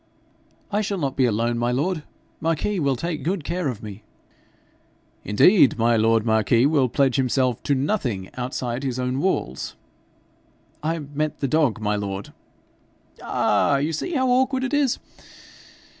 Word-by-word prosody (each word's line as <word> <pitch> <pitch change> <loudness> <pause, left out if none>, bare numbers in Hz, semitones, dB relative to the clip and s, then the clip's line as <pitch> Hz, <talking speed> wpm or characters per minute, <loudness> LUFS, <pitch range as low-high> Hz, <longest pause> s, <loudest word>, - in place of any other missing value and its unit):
'I 210 +1 +1
shall 200 -1 -2
not 140 -6 -2
be 130 - +3
alone, 115 +1 0
my 120 +1 +1
lord. 155 +6 -1 0.4
Marquis 165 +5 -1
will 140 -4 +1
take 160 +4 -3
good 175 0 -2
care 170 +1 -2
of 120 -5 -4
me.' 105 -1 -8 1.2
'Indeed, 130 - +5
my 115 0 +3
lord 115 0 +3
marquis 110 +2 +3
will 140 -4 +3
pledge 135 +1 +2
himself 130 -2 +1
to 140 - +1
nothing 130 - -2
outside 125 0 -3
his 130 -3 -3
own 125 +1 -1
walls.' 140 - -2 1.1
'I 165 +2 -1
meant 150 +1 -1
the 140 - -1
dog, 140 -6 +2
my 105 -1 0
lord.' 100 -1 -5 0.9
'Ah! 140 - +2
you 150 +4 -1
see 345 - -3
how 260 -3 +1
awkward 260 +1 +2
it 265 - -3
is. 285 -4 +2
135 Hz, 150 wpm, -23 LUFS, 115-165 Hz, 1.2 s, Indeed